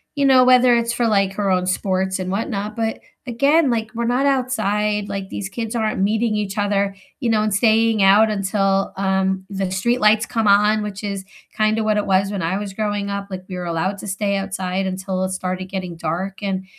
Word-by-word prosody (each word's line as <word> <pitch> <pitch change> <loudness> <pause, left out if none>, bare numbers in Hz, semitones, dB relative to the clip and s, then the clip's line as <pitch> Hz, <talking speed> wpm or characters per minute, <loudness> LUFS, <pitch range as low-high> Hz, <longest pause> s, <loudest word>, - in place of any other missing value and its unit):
you 280 - +1
know, 260 -2 +6
whether 250 -1 +5
it's 235 0 0
for, 240 -1 0
like, 195 -2 +2
her 200 0 -1
own 180 -1 +1
sports 190 0 -1
and 185 0 -3
whatnot, 210 0 -3
but 225 -1 -2 0.3
again, 280 +5 +3
like, 225 -2 -1
we're 235 - -1
not 250 +4 +1
outside, 210 -6 0
like, 195 -1 -5
these 195 - -5
kids 225 +2 -5
aren't 220 -4 -1
meeting 215 +2 +1
each 205 0 -3
other, 200 -1 0 0.3
you 240 - 0
know, 215 -1 +2
and 215 -2 0
staying 220 0 +3
out 210 +3 +6
until, 195 -1 0
um, 190 -1 0
the 195 -1 -2
streetlights 215 +3 +2
come 225 -3 -1
on, 210 +1 +4
which 205 0 -6
is 200 -2 -4 0.3
kinda 215 +1 +2
what 215 -1 +1
it 210 - 0
was 195 +1 +1
when 200 - -3
I 170 +4 -1
was 205 -2 -5
growing 205 -1 -2
up, 200 0 -4
like, 185 -1 -6
we 185 - -5
were 180 -1 -5
allowed 170 +4 -2
to 205 - -8
stay 200 +1 -1
outside 190 -1 -3
until 185 0 -3
it 185 - -2
started 185 0 -3
getting 185 -3 -5
dark, 180 +5 -4
and, 190 -1 -2
200 Hz, 210 wpm, -20 LUFS, 190-220 Hz, 0.3 s, know